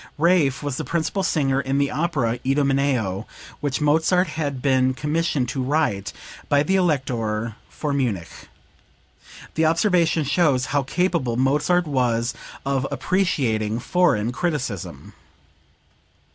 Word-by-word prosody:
Raaff 155 -4 +2
was 145 -3 -3
the - - -3
principal 170 +4 -1
singer 140 -7 +1
in 135 +1 -1
the 140 0 +1
opera 135 -6 -1
"Idomeneo," 135 -7 0 0.3
which 145 0 -2
Mozart 160 +4 +3
had 145 -4 -3
been 130 -1 +2
commissioned 150 -1 0
to 135 - -2
write 130 -8 0 0.4
by 145 0 +4
the 190 +5 +1
Elector 115 - 0
for 150 -2 -3
Munich. 115 -11 -3 1.0
The 160 - +1
observation 165 -1 +2
shows 140 -3 +2
how 145 - +3
capable 140 -4 0
Mozart 150 +7 +2
was 125 -4 0 0.3
of 135 -1 0
appreciating 130 - 0
foreign 120 -5 +1
criticism.) 115 - -4
140 Hz, 115 wpm, -23 LUFS, 125-160 Hz, 1.0 s, by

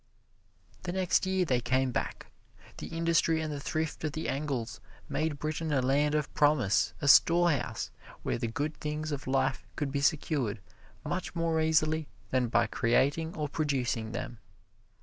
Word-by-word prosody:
The 180 - -4
next 185 0 +1
year 190 -1 +2
they 125 -6 +1
came 130 +2 +1
back. - - -3 0.5
The - - -6
industry 165 -1 +2
and 155 -1 -3
the 145 - -4
thrift 155 +3 -3
of 155 -2 -1
the 155 -7 -3
Engles 135 -4 -3 0.3
made 155 0 -1
Britain 155 +2 -3
a 140 - +3
land 145 +4 +2
of 150 -2 -1
promise, 145 -9 +3
a - - +1
storehouse 170 +2 +4 0.3
where - - -1
the - - -1
good 145 +7 -2
things 150 +1 -3
of 140 -3 -4
life 135 0 +1
could 145 -3 -2
be 140 0 -1
secured 140 -7 0 0.5
much 175 -2 -3
more 165 -1 +1
easily 155 -1 +2 0.2
than 130 -1 +2
by 120 0 +3
creating 145 +7 +1
or 150 -1 -1
producing 130 -7 -1
them. 120 0 -5
150 Hz, 160 wpm, -30 LUFS, 130-160 Hz, 0.5 s, storehouse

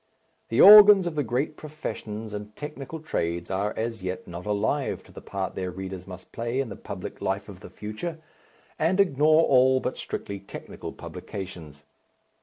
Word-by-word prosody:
The 115 - 0
organs 205 -1 +10
of 175 - -2
the 150 - 0
great 130 +6 -1
professions 110 -8 -6
and 105 0 -7
technical 150 +1 -7
trades 85 - -3
are 100 +2 0
as 115 0 -3
yet 90 0 -5
not 90 +2 -8
alive 110 +7 -1
to - - -18
the - - -11
part 95 -2 -4
their 90 -1 -3
readers 95 0 -7
must 90 -1 -11
play 115 +3 -2
in 135 -4 -1
the - - -7
public - - -8
life - - -2
of - - -11
the - - -11
future, 110 +11 -6 0.6
and 170 +5 +2
ignore 155 -3 +4
all 130 -2 +5
but - - -3
strictly 100 -1 -5
technical 100 - -9
publications. 85 -7 -8
110 Hz, 170 wpm, -26 LUFS, 95-150 Hz, 0.6 s, organs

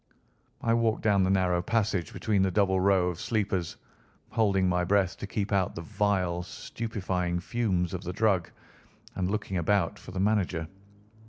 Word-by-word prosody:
I 115 - +2
walked 115 -1 +1
down 100 -3 +4
the - - 0
narrow 90 -2 +2
passage 100 -3 0
between 110 -5 0
the 95 - +3
double 95 -1 +2
row 95 -1 +3
of 85 - -5
sleepers, 100 -6 -1 0.6
holding 100 -5 +2
my 90 0 +1
breath 95 0 +2
to - - -6
keep 105 -1 -2
out 95 -3 +1
the 85 - -5
vile, 90 -1 0
stupefying 90 -2 -3
fumes 95 -4 -1
of 90 0 -4
the 90 - -3
drug, 95 -3 +1 0.6
and 90 0 -1
looking 100 -2 -2
about 90 0 +1
for - - -12
the 95 0 -5
manager. 95 -5 +1
95 Hz, 165 wpm, -28 LUFS, 90-105 Hz, 0.6 s, down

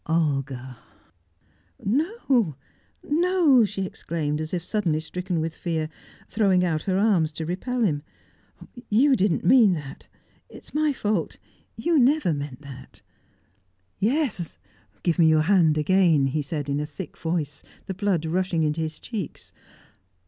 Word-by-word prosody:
"Olga 135 -6 -1 0.5
" - - -26 0.4
"No, 230 - +2 0.5
no!" 325 -5 +4
she 200 -2 -2
exclaimed, 155 -4 -3
as 155 - -5
if 175 -2 -2
suddenly 180 -6 0
stricken 175 +2 -3
with 160 0 -3
fear, 160 -3 -2 0.4
throwing 190 -4 +2
out 160 -3 0
her 190 +2 -1
arms 190 -7 +2
to 160 +1 -5
repel 235 +9 -2
him. 150 -8 +1 0.9
"You 265 +6 +4
didn't 185 -6 +1
mean 220 -2 +6
that! 145 -5 -7 0.4
It - - -13
is - - -15
my 305 0 +2
fault. 210 - -2 0.4
You 305 +8 +2
never 265 - +3
meant 145 -1 -6
that." 130 -2 -12 1.0
"Yes! 230 - 0 0.5
Give 170 -1 +1
me 165 - +6
your 155 -1 +4
hand 165 -4 +4
again!" 165 -2 +3
he 135 +3 0
said 145 0 -4
in 140 0 -1
a 150 - -3
thick 155 +3 -8
voice, 160 -4 -3 0.2
the 190 - -4
blood 190 -4 0
rushing 175 0 0
into 155 +1 0
his 155 -1 -4
cheeks. 215 -9 -7
170 Hz, 145 wpm, -25 LUFS, 155-210 Hz, 1.0 s, mean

